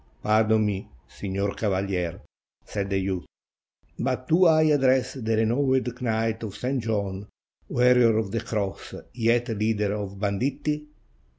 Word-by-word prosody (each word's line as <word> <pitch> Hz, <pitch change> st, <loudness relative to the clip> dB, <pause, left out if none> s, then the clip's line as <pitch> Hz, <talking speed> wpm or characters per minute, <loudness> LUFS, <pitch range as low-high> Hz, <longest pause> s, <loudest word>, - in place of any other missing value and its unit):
"Pardon 110 Hz, 0 st, +3 dB
me, 100 Hz, -2 st, -3 dB, 0.2 s
signor 100 Hz, 0 st, -3 dB
cavaher," 95 Hz, -4 st, -2 dB, 0.4 s
said 100 Hz, -2 st, -3 dB
the 100 Hz, -, +1 dB
youth; 95 Hz, -2 st, -2 dB, 0.7 s
"but 130 Hz, 0 st, -2 dB
do 180 Hz, +3 st, +5 dB
I 155 Hz, -1 st, +5 dB
address 135 Hz, -4 st, +3 dB
the 115 Hz, -4 st, -1 dB
renowned 125 Hz, +2 st, +1 dB
Knight 115 Hz, -1 st, 0 dB
of 110 Hz, -4 st, -6 dB
St. 130 Hz, +1 st, -1 dB
John, 100 Hz, -3 st, -2 dB, 0.4 s
warrior 125 Hz, -2 st, +4 dB
of 110 Hz, -3 st, -1 dB
the 115 Hz, -, -1 dB
Cross, 105 Hz, -4 st, -4 dB, 0.2 s
yet 120 Hz, +1 st, +1 dB
leader 105 Hz, -1 st, 0 dB
of 100 Hz, -2 st, -5 dB
banditti?" 140 Hz, +9 st, -1 dB
110 Hz, 130 wpm, -25 LUFS, 100-125 Hz, 0.7 s, do